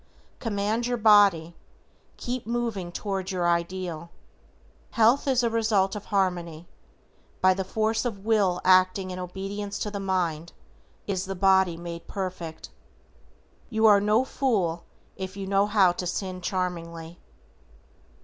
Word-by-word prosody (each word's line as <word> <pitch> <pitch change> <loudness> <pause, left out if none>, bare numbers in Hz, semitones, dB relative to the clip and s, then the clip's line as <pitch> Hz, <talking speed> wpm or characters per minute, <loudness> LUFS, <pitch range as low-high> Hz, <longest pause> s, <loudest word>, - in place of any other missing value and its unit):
COMMAND 220 +1 -1
YOUR 245 0 -1
BODY. 200 -7 +4 0.6
KEEP 245 -2 -4
MOVING 230 -7 -2
TOWARD 195 0 -4
YOUR 180 -3 -1
IDEAL. 170 -1 -2 0.8
Health 235 +6 +3
is 255 -2 +2
a 235 - +2
result 215 -3 +1
of 210 - -7
Harmony. 175 -4 -1 0.7
By 185 0 +5
the 190 +1 -3
force 220 +3 -1
of 240 -4 -2
the 195 - -16
WILL 200 -4 +1
acting 185 0 +4
in 185 - -6
obedience 195 +3 -5
to 210 - -3
the 200 - -4
mind, 175 -4 -2 0.5
is 190 -1 -2
the 195 0 -5
body 190 -2 +3
made 170 0 -8
perfect. 180 -5 -6 1.0
You 220 -1 +1
are 205 -2 +7
no 215 +5 +2
fool 195 -13 -1 0.3
if 190 +1 -6
you 195 - -4
know 200 +1 +2
how 200 -4 +4
to 180 +1 -4
sin 185 0 -4
charmingly. 170 -2 -4
190 Hz, 140 wpm, -26 LUFS, 180-210 Hz, 1.0 s, are